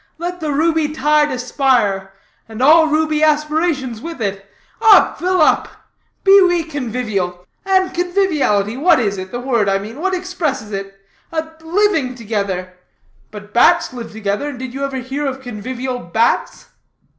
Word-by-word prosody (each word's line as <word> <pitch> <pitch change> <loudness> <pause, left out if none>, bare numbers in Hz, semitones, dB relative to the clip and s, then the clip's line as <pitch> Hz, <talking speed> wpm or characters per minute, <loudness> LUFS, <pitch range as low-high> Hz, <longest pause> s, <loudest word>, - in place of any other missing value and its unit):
Let 350 +2 -5
the 310 -3 -2
ruby 320 +1 +1
tide 300 0 +2
aspire, 245 -7 0 0.4
and 220 0 -9
all 315 +5 +6
ruby 310 0 +1
aspirations 305 -5 0
with 330 -1 -7
it! 195 -2 -4 0.3
Up, 435 -2 +5
fill 365 +1 +1
up! - - +3 0.6
Be 395 0 +7
we 350 -2 +3
convivial. 220 - -4 0.2
And 375 -1 +2
conviviality, 320 - 0
what 330 +2 +4
is 200 -5 -1
it? 185 0 -7
The 245 - -5
word, 235 -5 0
I 195 - +2
mean; 220 +8 -8
what 380 +1 0
expresses 340 - -3
it? 195 0 -5 0.4
A 320 -1 -2 0.2
living 325 -7 +1
together. 200 -5 -3 0.6
But 210 0 -11
bats 340 +4 +4
live 240 -2 -7
together, 210 +6 -3
and 280 - -8
did 255 -1 -7
you 275 +1 -4
ever 275 -1 -3
hear 270 +3 -3
of 265 -1 -4
convivial 250 +1 -5
bats?" 220 +4 -1
265 Hz, 155 wpm, -18 LUFS, 220-320 Hz, 0.6 s, Be